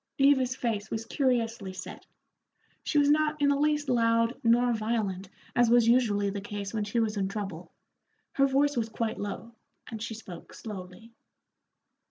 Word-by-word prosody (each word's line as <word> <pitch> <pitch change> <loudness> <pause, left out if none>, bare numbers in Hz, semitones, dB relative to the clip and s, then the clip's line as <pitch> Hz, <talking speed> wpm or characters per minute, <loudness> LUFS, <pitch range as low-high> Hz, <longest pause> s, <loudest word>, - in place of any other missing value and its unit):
Eva's 265 -2 +4
face 220 -4 -2
was 225 0 -4
curiously 230 -6 0
set; 185 0 -9 0.7
she - - -1
was 290 0 +5
not 305 0 +2
in 285 -1 +3
the 285 - +3
least 295 0 +1
loud 230 -1 +2
nor 240 +1 +4
violent 215 -4 -2 0.3
as 240 -2 +4
was 240 -1 +5
usually 210 -5 +3
the 200 0 -5
case 205 -1 -6
when 215 -2 -1
she 210 +3 -1
was 220 -2 0
in 195 -1 0
trouble, 195 -4 -6 0.6
her 275 0 +3
voice 285 +2 +2
was 230 -2 -1
quite 225 0 -3
low, 215 +3 -6 0.4
and 220 -2 -6
she 225 -1 -4
spoke 180 -6 -11
slowly. 205 +1 -9
230 Hz, 165 wpm, -28 LUFS, 205-255 Hz, 0.7 s, was